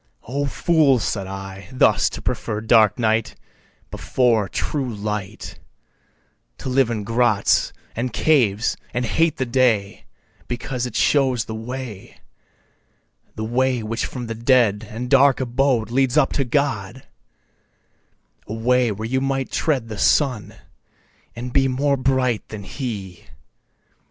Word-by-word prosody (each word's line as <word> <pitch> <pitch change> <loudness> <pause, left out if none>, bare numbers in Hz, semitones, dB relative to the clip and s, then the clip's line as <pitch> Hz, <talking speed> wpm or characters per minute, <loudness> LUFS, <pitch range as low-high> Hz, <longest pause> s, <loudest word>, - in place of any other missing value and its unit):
O 140 +4 -2
fools 140 -5 +2
(said 100 -3 -2
I,) 95 0 -8
thus 130 - +3
to - - -8
prefer 105 - -2
dark 110 -1 +4
night 110 -2 0 0.6
Before 115 -6 +1
true 130 - -2
light, 105 -1 -5 1.0
To - - -5
live 130 -1 +2
in 110 -3 -3
grots, 115 -1 +2 0.2
and 120 +2 -2
caves, 120 -9 +2 0.2
and 120 0 0
hate 160 +8 +1
the 130 - -1
day 115 -5 +1 0.4
Because 125 0 -3
it - - -10
shows 130 -6 +2
the 110 - -6
way, 115 -2 -7 1.2
The 110 - -4
way 125 +1 0
which 115 +2 -2
from 125 -2 -6
the 115 - -4
dead 115 -3 +2
and 120 +3 -5
dark 135 0 +5
abode 125 -3 0
Leads 130 +1 +1
up 150 - +3
to 140 - +1
God, 125 -4 -1 1.4
A 105 - -5
way 125 +1 +2
where 110 +2 -4
you 130 +2 0
might 135 -1 -2
tread 135 -8 0
the 110 -2 -7
Sun, 110 -8 +1 0.8
and 120 +1 -6
be 135 -1 +3
More 140 +2 +1
bright 130 -3 0
than 105 -2 -7
he. 95 - -6
120 Hz, 135 wpm, -21 LUFS, 110-130 Hz, 1.4 s, dark